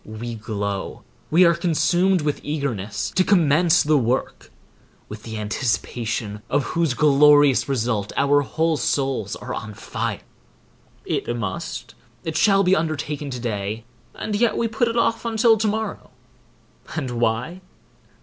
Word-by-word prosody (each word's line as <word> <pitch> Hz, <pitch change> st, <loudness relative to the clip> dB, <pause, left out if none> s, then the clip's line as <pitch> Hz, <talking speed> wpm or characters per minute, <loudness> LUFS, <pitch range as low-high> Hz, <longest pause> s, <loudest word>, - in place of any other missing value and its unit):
We 115 Hz, +2 st, -7 dB
glow, 100 Hz, -3 st, -4 dB, 0.3 s
we 175 Hz, +4 st, +5 dB
are 170 Hz, -, +5 dB
consumed 175 Hz, +2 st, +2 dB
with 150 Hz, -1 st, -1 dB
eagerness 135 Hz, -10 st, -3 dB
to 185 Hz, -, +2 dB
commence 175 Hz, -2 st, +4 dB
the 150 Hz, -1 st, +3 dB
work, 125 Hz, +2 st, -2 dB, 0.6 s
with 105 Hz, 0 st, -9 dB
the 110 Hz, 0 st, -7 dB
anticipation 110 Hz, 0 st, -2 dB
of 145 Hz, 0 st, +1 dB
whose 165 Hz, -4 st, -1 dB
glorious 145 Hz, -2 st, +5 dB
result 115 Hz, -6 st, -1 dB
our 145 Hz, +1 st, +4 dB
whole 160 Hz, +3 st, 0 dB
souls 135 Hz, -8 st, -1 dB
are -, -, -7 dB
on 105 Hz, -1 st, -6 dB
fire. -, -, -4 dB, 0.8 s
It 120 Hz, -, -2 dB
must, 120 Hz, -, -5 dB, 0.3 s
it 160 Hz, -1 st, -4 dB
shall 195 Hz, +3 st, +4 dB
be 185 Hz, +1 st, +4 dB
undertaken 150 Hz, -3 st, -2 dB
to 125 Hz, -2 st, -5 dB
day, 110 Hz, -2 st, -3 dB, 0.3 s
and 210 Hz, -, -3 dB
yet 230 Hz, +2 st, +2 dB
we 235 Hz, -, +1 dB
put 235 Hz, +2 st, 0 dB
it 230 Hz, +1 st, -2 dB
off 230 Hz, -1 st, +1 dB
until 230 Hz, 0 st, +3 dB
to 220 Hz, 0 st, 0 dB
morrow; 215 Hz, 0 st, -3 dB, 0.9 s
and 140 Hz, -6 st, -3 dB
why? 120 Hz, +9 st, -1 dB
145 Hz, 140 wpm, -22 LUFS, 115-170 Hz, 0.9 s, we